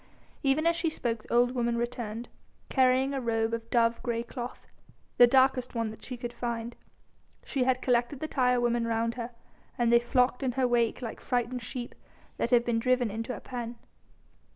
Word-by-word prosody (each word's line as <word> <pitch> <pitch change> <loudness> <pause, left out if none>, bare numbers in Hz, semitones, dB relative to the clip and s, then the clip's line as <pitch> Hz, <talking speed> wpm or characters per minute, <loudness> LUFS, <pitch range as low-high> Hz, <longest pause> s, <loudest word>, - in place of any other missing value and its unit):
Even 280 +3 +2
as 335 0 +4
she 335 0 0
spoke 235 -7 -2
the - - -14
old 245 +1 +4
woman 235 -2 0
returned, 235 -1 -4 0.4
carrying 260 +1 +3
a 270 - -2
robe 225 -1 0
of 230 0 -4
dove 230 -1 +2
grey 235 -2 -1
cloth, 245 0 -7 0.5
the 245 - +9
darkest 260 0 +3
one 230 -2 -1
that 220 - -12
she 250 - -6
could 240 0 -5
find. 235 -1 -4 0.7
She 265 -3 0
had 255 0 +1
collected 245 +2 +1
the 310 - -3
tire 250 -4 +2
women 240 -1 +1
round 230 0 0
her, 235 -1 -5 0.5
and 235 -1 +2
they 235 - +8
flocked 250 +1 +1
in 260 -2 0
her 260 0 +2
wake 240 0 +1
like 230 - -5
frightened 245 0 -1
sheep 240 +1 -6 0.4
that - - 0
have 240 -1 +4
been 235 -1 +1
driven 250 -1 +2
into 225 +4 -4
a - - -8
pen. 240 -2 -6
240 Hz, 190 wpm, -29 LUFS, 235-255 Hz, 0.7 s, the